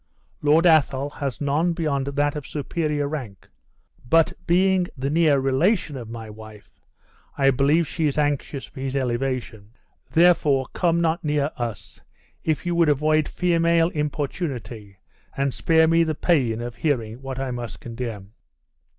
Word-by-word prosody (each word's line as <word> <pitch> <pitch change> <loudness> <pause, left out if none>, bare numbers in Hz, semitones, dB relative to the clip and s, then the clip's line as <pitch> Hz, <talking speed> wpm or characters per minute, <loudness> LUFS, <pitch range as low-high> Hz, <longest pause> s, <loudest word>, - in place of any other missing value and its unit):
Lord 155 +3 +4
Athol 145 -4 +3
has 140 -4 -4
none 150 +5 +1
beyond 145 -5 -1
that 145 +1 0
of 150 -2 -6
superior 150 0 -2
rank; 130 -10 -7 0.6
but 165 +2 +4
being 185 +1 +3
the 135 +2 -2
near 155 -3 +4
relation 150 +5 +1
of 120 -4 -7
my 115 -1 -7
wife, 110 -1 -13 0.6
I 135 -1 +4
believe 145 +5 +2
she 160 +1 -1
is 145 - -2
anxious 145 -2 -1
for - - -13
his 135 0 -3
elevation. 120 -4 -3 0.4
Therefore 160 -6 +4
come 170 -1 +1
not 165 0 0
near 150 -1 0
us, 120 -3 -6 0.4
if 155 +2 -1
you 175 - 0
would 170 -2 +3
avoid 155 +1 +2
female 170 -1 +2
importunity, 135 - -4 0.4
and 140 -1 0
spare 160 -1 +3
me 165 +1 +4
the 160 -1 -1
pain 125 -10 +1
of 120 -1 -6
hearing 120 -3 -2
what 135 -1 -6
I 135 -1 -3
must 120 -3 -6
condemn." 115 -4 -7
145 Hz, 150 wpm, -23 LUFS, 125-160 Hz, 0.6 s, Lord